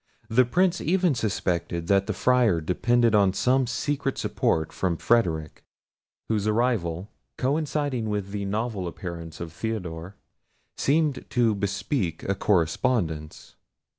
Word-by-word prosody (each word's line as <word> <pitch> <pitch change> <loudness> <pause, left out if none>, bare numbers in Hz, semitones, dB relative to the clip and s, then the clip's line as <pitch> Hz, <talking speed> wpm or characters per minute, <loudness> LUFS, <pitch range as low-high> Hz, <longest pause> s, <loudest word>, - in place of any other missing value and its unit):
The 125 +3 +4
Prince 175 +7 +2
even 180 -1 +2
suspected 90 -7 -1
that 100 +2 +2
the 110 - -1
Friar 120 -4 +3
depended 115 +8 +2
on 100 -3 +4
some 130 +5 +2
secret 140 +2 -2
support 80 0 0
from 90 -3 -1
Frederic, 80 -11 0 0.6
whose 105 -2 0
arrival, 105 -6 0 0.3
coinciding 145 -4 -1
with 100 -2 -3
the 100 -1 -3
novel 105 -2 -2
appearance 85 -2 -7
of 80 -2 -6
Theodore, 90 -3 -5 0.6
seemed 150 -1 +1
to 120 -3 +2
bespeak 100 - -2
a 100 - 0
correspondence. 85 -3 0
105 Hz, 120 wpm, -26 LUFS, 85-125 Hz, 0.6 s, The